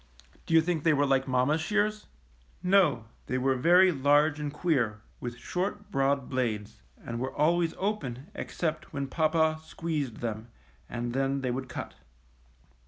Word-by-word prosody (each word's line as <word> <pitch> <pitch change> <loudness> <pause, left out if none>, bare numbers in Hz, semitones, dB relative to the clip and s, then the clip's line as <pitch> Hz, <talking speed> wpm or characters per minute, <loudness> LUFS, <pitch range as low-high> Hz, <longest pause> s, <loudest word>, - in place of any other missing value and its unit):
Do 165 - +2
you 160 - +8
think 165 -1 -1
they 165 - +4
were 145 0 +3
like 135 -1 +2
mamma's 130 +5 +2
shears? 210 +4 0 0.6
No, 180 - +3 0.2
they 130 - -1
were 135 +1 +2
very 175 +8 +5
large 145 +1 +3
and 150 -1 -3
queer, 135 -9 0 0.2
with 120 -1 -5
short, 195 +9 -3
broad 135 0 +1
blades, 115 -6 -2 0.2
and 115 0 -4
were 130 +2 -3
always 165 +2 +2
open 165 - -3
except 160 -2 -4
when 140 -1 -2
papa 155 +2 +1
squeezed 155 -7 -3
them, 110 -1 -4 0.4
and 120 0 -3
then 135 +1 0
they 130 -2 -1
would 130 +1 -4
cut. - - -6
145 Hz, 155 wpm, -29 LUFS, 130-165 Hz, 0.6 s, you